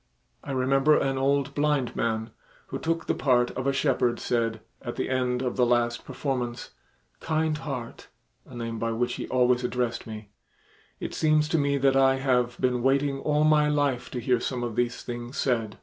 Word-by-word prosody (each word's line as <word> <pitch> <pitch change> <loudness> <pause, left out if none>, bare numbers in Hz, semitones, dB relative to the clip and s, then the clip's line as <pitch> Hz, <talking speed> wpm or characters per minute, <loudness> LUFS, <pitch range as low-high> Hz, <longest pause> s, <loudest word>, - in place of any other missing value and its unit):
I - - -10
remember 135 +3 +3
an 135 -1 0
old 140 +1 +1
blind 145 -4 0
man, 110 0 -1 0.4
who - - -4
took 165 0 -1
the - - +1
part 125 -3 +2
of 130 +1 -3
a - - +4
shepherd, 130 -3 +1
said, 115 -2 -1 0.2
at - - -5
the - - -2
end 125 -1 0
of 125 - -2
the 125 - +4
last 120 -1 +1
performance, 125 -4 -3 0.5
"Kind 155 -1 0
Heart," 130 -6 -6 0.4
a 130 - -12
name 115 -1 -4
by 115 0 -1
which 125 +2 -1
he - - -5
always 125 -1 +2
addressed 125 -2 -2
me, 105 -2 -9 0.7
"it - - -5
seems 155 -1 +2
to 165 - +2
me 140 0 +1
that 135 0 +3
I 135 0 +5
have 125 -2 0
been 125 -1 +1
waiting 135 +2 +1
all 150 +1 +1
my 150 -1 +4
life 145 -4 0
to 125 - -4
hear 125 0 +1
some 125 0 -3
of 120 -3 -3
these 120 0 -1
things 120 +1 -6
said. 115 -5 0
130 Hz, 190 wpm, -26 LUFS, 120-140 Hz, 0.7 s, I